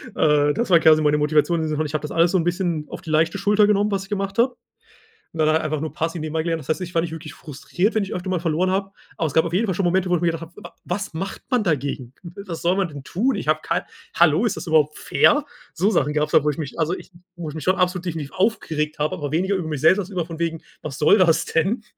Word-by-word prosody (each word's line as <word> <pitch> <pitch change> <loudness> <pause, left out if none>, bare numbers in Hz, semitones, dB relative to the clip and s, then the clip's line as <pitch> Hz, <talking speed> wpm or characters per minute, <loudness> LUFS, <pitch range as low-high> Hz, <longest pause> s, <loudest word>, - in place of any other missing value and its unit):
Äh, 150 -1 +3
das 235 +5 -2
war 170 -2 +6
quasi 155 -1 +5
meine 150 0 +3
Motivation 150 +3 +2
und 160 - -1
so 155 -1 -2
ich 150 - -6
habe 155 - -1
das 150 - -6
alles 165 +1 +3
so 190 - +3
'n 170 - +1
bisschen 175 -3 -1
auf - - -8
die 160 - -10
leichte 165 +4 +2
Schulter 205 +1 +3
genommen, 210 0 +2
was 195 -1 -1
ich 195 - -14
gemacht 195 0 -3
habe. 245 +1 +3 0.8
Und 165 - -11
dann 155 -1 +2
halt 160 +1 +3
einfach 155 -1 -2
nur 155 +1 -4
passiv 165 0 -3
dem 155 - -5
erklären. 165 +1 0
Das 150 - -12
heißt, 155 - 0
ich 180 -1 -6
war 165 - +3
nicht 170 - -4
wirklich 155 -2 -8
frustriert, 175 - -2
wenn 220 - +1
ich 195 - -5
öfter 180 +1 -4
mal 180 - 0
verloren 170 +2 0
habe. 195 0 -1 0.2
Aber 165 - -1
es 145 - -6
gab 160 - +4
auf 170 - -4
jeden 215 +5 +1
Fall 190 - -1
schon 190 0 0
Momente, 180 +1 +1
wo 180 - +3
ich 170 - -2
mir 170 - +3
gedacht 165 0 -6
habe: 165 +1 -10
„Wa 210 - -11
was 200 +1 -4
macht 190 +4 -5
man 250 -4 +2
dagegen? 140 - -2
Was 175 -1 -8
soll 175 +2 +2
man 195 -2 +1
denn 145 -3 -10
tun? 235 - 0
Ich - - -5
habe - - +2
kein - - -1 0.3
hallo, 170 +5 +4
ist 220 - -1
das 160 - -6
überhaupt 155 -2 +2
fair?“ 295 0 +3 0.3
So 190 +6 +1
Sachen 150 -6 +1
gab's 150 0 0
da, 155 - +5
wo 150 - +2
ich 150 - -3
mich 150 -2 -6
also, 165 +3 +1
ich - - -12 0.2
wo 170 -2 -6
ich - - -8
mich 155 - -6
schon 185 +5 +2
absolut 180 0 0
definitiv 160 -5 -4
aufgeregt 160 -7 -1
habe, 150 +5 -1
aber 145 -5 -5
weniger 190 +5 +1
über 180 -4 -3
mich 150 -4 -4
selbst 190 +3 +5
als 190 0 -4
über 180 -4 -2
von 165 -1 -9
wegen, 165 -1 -2 0.2
was 140 -3 -6
soll 155 +7 +5
das 170 -3 +3
denn? 195 +8 0
170 Hz, 290 wpm, -22 LUFS, 155-190 Hz, 0.8 s, war